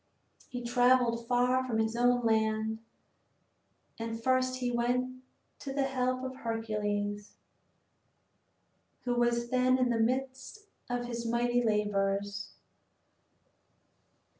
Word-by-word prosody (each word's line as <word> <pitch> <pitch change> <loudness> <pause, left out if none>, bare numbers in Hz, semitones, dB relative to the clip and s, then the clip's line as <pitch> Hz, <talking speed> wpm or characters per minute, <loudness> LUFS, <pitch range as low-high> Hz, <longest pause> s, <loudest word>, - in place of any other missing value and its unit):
He 245 -1 -5
traveled 245 -1 +3
far 250 +1 +2
from 245 -4 -2
his 220 +1 0
own 245 0 +3
land, 220 0 +1 1.2
and 225 0 -4
first 255 0 +2
he 250 -1 -2
went 250 +2 -1 0.4
to 275 - -6
the 280 0 +1
help 255 -1 -1
of 260 0 -5
Heracles, 210 -3 -2 1.7
who 245 - 0
was 240 0 +1
then 255 0 +3
in 255 -1 +2
the 230 - +1
midst 265 - -2 0.2
of 245 0 -2
his 235 -1 -4
mighty 240 +1 +1
labors. 205 -2 0
240 Hz, 110 wpm, -31 LUFS, 225-255 Hz, 1.7 s, traveled